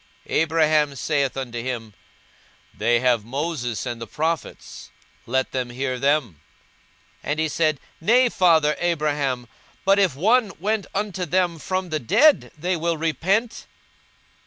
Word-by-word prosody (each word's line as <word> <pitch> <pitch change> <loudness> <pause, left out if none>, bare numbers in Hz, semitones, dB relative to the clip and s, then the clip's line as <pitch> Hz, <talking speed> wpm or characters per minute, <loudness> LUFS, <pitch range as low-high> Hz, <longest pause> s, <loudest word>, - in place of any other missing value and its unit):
42:016:029 - - -3
Abraham 155 -2 +2
saith 140 -1 -1
unto 120 -3 -4
him, 115 -4 -5 0.8
They 120 +2 +2
have 125 -4 +2
Moses 130 -2 -3
and 120 -2 -5
the 115 - -6
prophets; 155 - -4 0.4
let 130 +2 0
them 130 -2 -2
hear 130 +1 -3
them. 135 - 0 0.8
42:016:030 - - -7
And 150 +1 0
he 160 - +1
said, 155 -1 0 0.2
Nay, 245 +8 +4
father 160 -7 +3
Abraham: 145 -7 -1 0.4
but 195 +1 +4
if 185 -9 +2
one 215 - +2
went 210 -1 -1
unto 195 -2 -2
them 175 -3 0
from 185 +2 -3
the 155 -1 -1
dead, 285 - +4
they 180 +4 -1
will 165 0 -1
repent. 185 - -1
155 Hz, 140 wpm, -23 LUFS, 130-180 Hz, 0.8 s, Nay